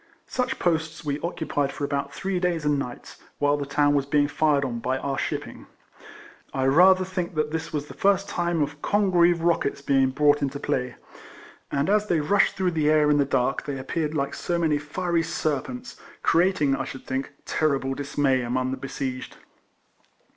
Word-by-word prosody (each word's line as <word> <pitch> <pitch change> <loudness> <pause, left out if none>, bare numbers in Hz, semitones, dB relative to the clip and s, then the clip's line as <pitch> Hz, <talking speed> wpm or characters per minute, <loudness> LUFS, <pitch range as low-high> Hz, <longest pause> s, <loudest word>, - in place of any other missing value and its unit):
Such 250 -1 -2
posts 160 -1 -1
we 145 0 -1
occupied 155 -4 -2
for - - -7
about 140 0 -2
three 185 +5 -2
days 175 -4 -1
and 145 -1 +2
nights, 125 -3 -7 0.2
whilst 145 0 +2
the 140 - -4
town 145 +1 +3
was 140 -1 +1
being 145 0 +3
fired 145 -2 +2
on 120 -3 -3
by 130 +3 -1
our 135 +1 -2
shipping. - - -4 0.9
I 130 - +1
rather 185 +7 +5
think 180 -2 -4
this 155 +2 -2
was 150 -3 -2
the - - -11
first 200 0 +2
time 170 -3 0
of 145 +1 -6
Congreve 175 -4 +3
rockets 165 -5 0
being 135 -2 +3
brought 145 +2 +3
into 140 0 -2
play, 125 -2 -2 0.8
and 140 +1 0
as 210 +1 +2
they 170 -5 +2
rushed 195 +7 +2
through 185 -2 0
the 155 -2 +1
air 150 -1 +4
in 145 - +3
the 140 - +3
dark, 130 0 0
they 140 -1 -3
appeared 150 +3 -3
like 140 -1 -1
so 175 - -2
many 155 -3 +1
fiery 170 +3 -1
serpents, 165 - -3 0.3
creating, 165 -5 +3
I - - -2
should 130 - -8
think, 130 +2 -3
ter 155 -3 +1
rible 135 0 -3
dismay 140 -2 +1
among 130 +2 -1
the 135 - -3
besieged. 130 -1 -5
150 Hz, 185 wpm, -25 LUFS, 140-170 Hz, 0.9 s, rather